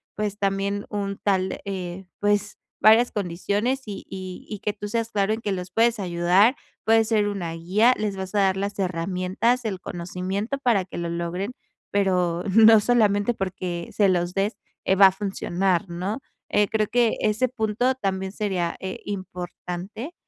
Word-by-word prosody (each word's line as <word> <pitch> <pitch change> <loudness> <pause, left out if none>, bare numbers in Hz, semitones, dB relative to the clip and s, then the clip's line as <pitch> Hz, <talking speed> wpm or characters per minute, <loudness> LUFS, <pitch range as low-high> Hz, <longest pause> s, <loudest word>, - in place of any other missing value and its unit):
pues, 210 -1 -2
también 200 +1 -1
un 200 -1 -3
tal, 190 -2 +1
eh, 190 -1 -5
pues, 205 0 0 0.2
varias 225 +3 +6
condiciones 205 +7 -1
y 200 -2 -6
y 185 -1 -7
y 210 - -5
que 210 0 -2
tú 205 0 -6
seas 230 +1 -1
claro 200 +1 +1
en 220 - -4
que 205 - -2
los 180 -1 -5
puedes 230 +2 +2
ayudar, 180 +7 +3 0.3
puede 225 0 +5
ser 215 -2 +2
una 175 -5 -4
guía, 195 +9 +3
les 210 -2 -2
vas 190 0 -5
a - - +4
dar 190 -1 +2
las 200 +1 -3
herramientas, 185 +7 0
el 195 -4 -2
conocimiento 185 +8 -4
para 230 -8 +2
que - - -9
lo 170 -1 -2
logren, 170 +6 -3 0.4
pero 180 -3 +1
no 225 0 +8
solamente 210 -1 +3
porque 185 -4 -4
se 205 -2 +3
los 175 -1 0
des, 200 +3 0 0.3
eh, 190 - +3
va 195 0 +9
a 190 - +3
funcionar 195 -1 -1
¿no? 185 +7 -3 0.3
Eh, 210 -1 +3
creo 215 -1 0
que 240 -2 +2
ese 215 +4 +2
punto 245 +1 0
también 190 -5 -2
sería, 190 -6 -1
eh, 190 0 -5
importante 185 - -6
200 Hz, 170 wpm, -24 LUFS, 185-215 Hz, 0.4 s, va